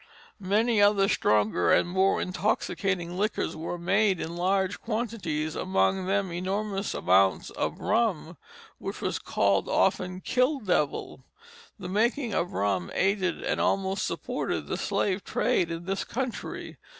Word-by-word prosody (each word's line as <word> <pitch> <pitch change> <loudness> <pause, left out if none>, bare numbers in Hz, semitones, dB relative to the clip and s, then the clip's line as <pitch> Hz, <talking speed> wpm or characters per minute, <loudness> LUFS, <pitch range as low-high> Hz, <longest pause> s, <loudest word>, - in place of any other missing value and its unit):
Many 210 +3 +2
other 205 -1 +5
stronger 105 - +2
and - - +4
more 190 +2 +2
intoxicating 185 -2 -1
liquors 210 +1 -1
were 165 +2 -4
made 190 +2 +2
in 165 +1 -4
large 190 +2 0
quantities, 215 -10 -2
among 190 0 +1
them 195 -1 0
enormous 195 +3 -2
amounts 95 +1 +3
of - - -3
rum, 205 -7 0 0.4
which - - -5
was - - -2
called 100 -1 +1
often 185 -1 +1
"kill 255 +8 +1
devil." 150 - -1 0.5
The 185 -4 -7
making 230 +4 +1
of 175 - -1
rum 95 -3 0
aided 190 -2 +1
and - - 0
almost 195 0 0
supported - - -3
the - - -3
slave 195 0 -1
trade 175 - +1
in 165 0 -5
this 195 +1 -2
country. 250 0 -5
190 Hz, 135 wpm, -27 LUFS, 170-205 Hz, 0.5 s, other